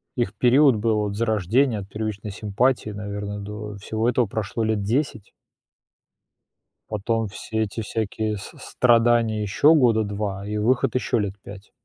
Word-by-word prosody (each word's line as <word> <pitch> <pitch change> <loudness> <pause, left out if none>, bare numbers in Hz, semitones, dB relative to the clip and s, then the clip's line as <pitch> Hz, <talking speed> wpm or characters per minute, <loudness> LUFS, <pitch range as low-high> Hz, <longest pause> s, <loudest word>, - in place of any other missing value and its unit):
их 120 -6 -1
период 125 +3 +4
был 110 0 +1
от 100 -1 -4
зарождения, 110 +2 +1
от 95 -1 -9
первичной 105 -1 -4
симпатии, 110 +4 0
наверное, 105 0 -5
до 105 +1 -7
всего 110 +3 -2
этого 125 0 +2
прошло 110 +2 -3
лет 110 -2 0
10. 115 -1 -2 1.6
Потом 110 +1 -1
все 110 +3 -3
эти 110 +2 -3
всякие 110 0 -2
с 95 - -9
страдания 115 -2 +2
ещё 140 +10 +4
года 120 -6 +4
2 100 -1 -4
и 105 0 -3
выход 120 +4 +1
ещё 125 -2 +1
лет 100 -2 -1
5. 100 0 -12
110 Hz, 145 wpm, -23 LUFS, 105-115 Hz, 1.6 s, период